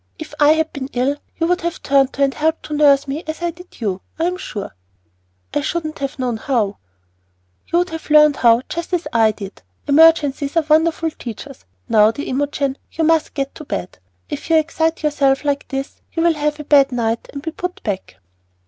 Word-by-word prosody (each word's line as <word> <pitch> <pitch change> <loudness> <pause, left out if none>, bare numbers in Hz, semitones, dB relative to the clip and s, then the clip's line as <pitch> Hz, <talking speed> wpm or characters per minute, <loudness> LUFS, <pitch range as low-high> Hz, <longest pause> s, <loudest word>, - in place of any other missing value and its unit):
If 315 -3 -9
I 295 +1 +6
had 320 0 -1
been 270 -1 -5
ill 260 +4 0 0.2
you 330 - +1
would 360 +1 +1
have 340 0 -4
turned 275 -1 +3
to 280 - 0
and 275 -1 +2
helped 320 +1 0
to 300 - -6
nurse 285 -1 +4
me 290 +5 -4
as 315 +2 -5
I 345 - 0
did 360 +2 -16
you, 195 -4 -2 0.2
I 325 - -1
am 360 +2 0
sure." 205 - -7 0.8
"I 295 - +1
shouldn't 310 0 -3
have 275 +1 -4
known 250 -3 -1
how." 220 -4 -1 0.9
"You 340 - +1
would 355 0 +1
have 325 -1 -7
learned 300 -1 +6
how 235 0 +4
just 340 +2 -5
as 350 -1 0
I 225 -1 +5
did. 200 -2 -9 0.3
Emergencies 290 -1 +4
are 325 - +3
wonderful 320 +1 +2
teachers. 260 +1 -9 0.2
Now, 215 -1 +5
dear 255 +6 -4
Imogen, 280 0 -1
you 325 - -2
must 320 0 +2
get 275 -2 -2
to 310 - -10
bed. 185 - -5 0.3
If - - -6
you 325 - +4
excite 320 +1 +1
yourself 280 -2 +2
like 285 -1 -1
this 270 +1 -5
you 330 - 0
will 340 -1 +4
have 300 0 -2
a - - -5
bad 280 -2 +4
night 230 -2 -2
and 280 0 -7
be 320 - -3
put 360 +2 -6
back." 195 - -4
290 Hz, 205 wpm, -19 LUFS, 270-320 Hz, 0.9 s, I